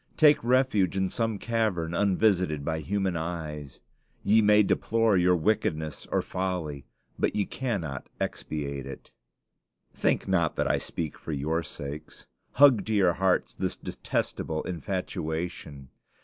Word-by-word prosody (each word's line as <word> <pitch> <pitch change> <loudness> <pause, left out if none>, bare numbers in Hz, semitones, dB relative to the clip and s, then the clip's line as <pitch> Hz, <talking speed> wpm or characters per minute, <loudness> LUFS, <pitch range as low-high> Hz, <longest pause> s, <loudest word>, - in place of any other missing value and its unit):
Take 150 -5 +6
refuge 120 -7 +2
in 95 -1 0
some 115 -3 -1
cavern 105 -8 -1
unvisited 90 -6 +2
by 80 -1 -1
human 95 +3 -1
eyes. 75 -5 -5 0.4
Ye 110 +2 +5
may 105 0 +6
deplore 115 +1 +2
your 90 0 +4
wickedness 80 -4 -1
or - - +1
folly, 90 -7 -3 0.3
but - - +1
ye 100 - +1
cannot 90 - -3
expiate 70 -3 -4
it. 70 - -10 0.8
Think - - 0
not 85 -4 +1
that - - 0
I - - +2
speak 80 -3 -5
for 80 - -5
your 80 +4 0
sakes. 75 -1 -8 0.3
Hug 130 -6 +6
to 110 - 0
your 95 -4 +4
hearts 95 +1 +1
this - - -2
detestable 80 -1 -3
infatuation. 80 -4 -4
90 Hz, 135 wpm, -27 LUFS, 75-105 Hz, 0.8 s, Take